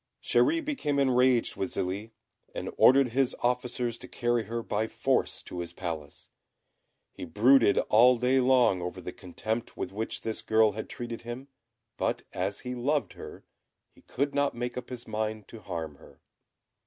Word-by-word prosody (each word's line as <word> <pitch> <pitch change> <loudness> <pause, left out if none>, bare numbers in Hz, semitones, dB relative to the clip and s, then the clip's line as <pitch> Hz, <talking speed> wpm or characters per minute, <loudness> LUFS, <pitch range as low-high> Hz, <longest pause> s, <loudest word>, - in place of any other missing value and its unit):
Chéri 325 0 +2
became 210 - -1
enraged 130 -3 +3
with 95 - -2
Zélie, 95 +4 -3 0.5
and - - -4
ordered 135 0 +6
his 130 +2 +1
officers 125 -1 -1
to - - -10
carry 120 -2 0
her 115 +2 -4
by 110 +1 -1
force - - 0
to 90 - -7
his 85 -1 -5
palace. 80 -5 -6 0.8
He - - -9
brooded 110 +6 +4
all 125 +3 +5
day 125 +2 +2
long 125 -7 +4
over 90 +1 -5
the 90 0 -7
contempt 110 +5 -5
with - - -4
which 110 +3 -4
this 110 -1 -3
girl 110 -1 +4
had 110 +2 -6
treated 120 -1 -6
him; 120 +4 -7 0.5
but - - -1
as 95 +2 -2
he 125 0 -5
loved 140 +4 -1
her, - - -10 0.5
he - - -21
could 140 +2 -2
not 140 -2 +1
make 120 0 -4
up 125 - -6
his 125 -2 -7
mind 110 -1 -3
to 115 - -10
harm 80 -7 -6
her. - - -18
120 Hz, 165 wpm, -28 LUFS, 105-125 Hz, 0.8 s, ordered